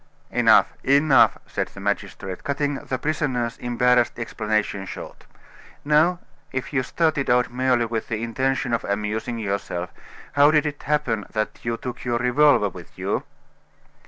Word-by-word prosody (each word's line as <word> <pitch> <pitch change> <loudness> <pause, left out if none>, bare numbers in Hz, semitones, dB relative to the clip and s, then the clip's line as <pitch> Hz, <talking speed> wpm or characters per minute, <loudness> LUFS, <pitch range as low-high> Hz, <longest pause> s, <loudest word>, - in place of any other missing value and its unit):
"Enough - - +4
enough!" 140 -1 +5
said - - -3
the - - -13
magistrate, 100 -2 -3
cutting 145 0 -1
the 130 - -3
prisoner's 130 -5 -1
embarrassed 125 0 +2
explanation 110 -4 -2
short. - - -9 0.6
"Now, 155 +4 +4 0.3
if 130 +2 -4
you 130 - +2
started 140 +2 0
out 125 -1 +3
merely 125 -1 +2
with 115 -1 -3
the 115 -1 -3
intention 130 +1 -1
of 115 - 0
amusing 105 +4 -2
yourself, 100 -4 -3 0.4
how 145 +1 +6
did 155 0 +3
it 145 -1 -4
happen 135 -8 -1
that 110 0 -2
you 115 0 -2
took 125 0 -7
your 120 -1 0
revolver 125 -2 +4
with 90 -2 -13
you?" - - -2
125 Hz, 145 wpm, -23 LUFS, 110-140 Hz, 0.6 s, how